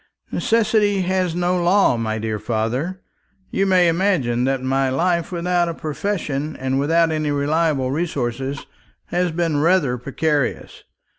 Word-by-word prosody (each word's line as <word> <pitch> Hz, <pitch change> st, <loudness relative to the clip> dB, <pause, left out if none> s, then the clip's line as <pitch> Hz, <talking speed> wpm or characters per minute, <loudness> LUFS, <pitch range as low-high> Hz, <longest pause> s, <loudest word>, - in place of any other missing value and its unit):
"Necessity 210 Hz, -3 st, +2 dB
has 185 Hz, -2 st, 0 dB
no 180 Hz, 0 st, 0 dB
law, 180 Hz, -4 st, +4 dB
my 110 Hz, -1 st, -2 dB
dear 110 Hz, -1 st, -3 dB
father. 125 Hz, -, -2 dB, 0.5 s
You 195 Hz, -, +1 dB
may 185 Hz, -2 st, +4 dB
imagine 165 Hz, -9 st, +1 dB
that 135 Hz, -1 st, -1 dB
my 135 Hz, 0 st, +1 dB
life, 170 Hz, +6 st, 0 dB
without 175 Hz, 0 st, 0 dB
a 165 Hz, -, -4 dB
profession 155 Hz, -3 st, -3 dB
and 130 Hz, +1 st, -1 dB
without 165 Hz, +3 st, +2 dB
any 155 Hz, -1 st, -1 dB
reliable 145 Hz, -2 st, +1 dB
resources, 135 Hz, -3 st, -3 dB, 0.4 s
has 180 Hz, 0 st, 0 dB
been 165 Hz, -2 st, 0 dB
rather 155 Hz, -7 st, +2 dB
precarious. 145 Hz, +2 st, -2 dB
160 Hz, 135 wpm, -21 LUFS, 135-180 Hz, 0.5 s, law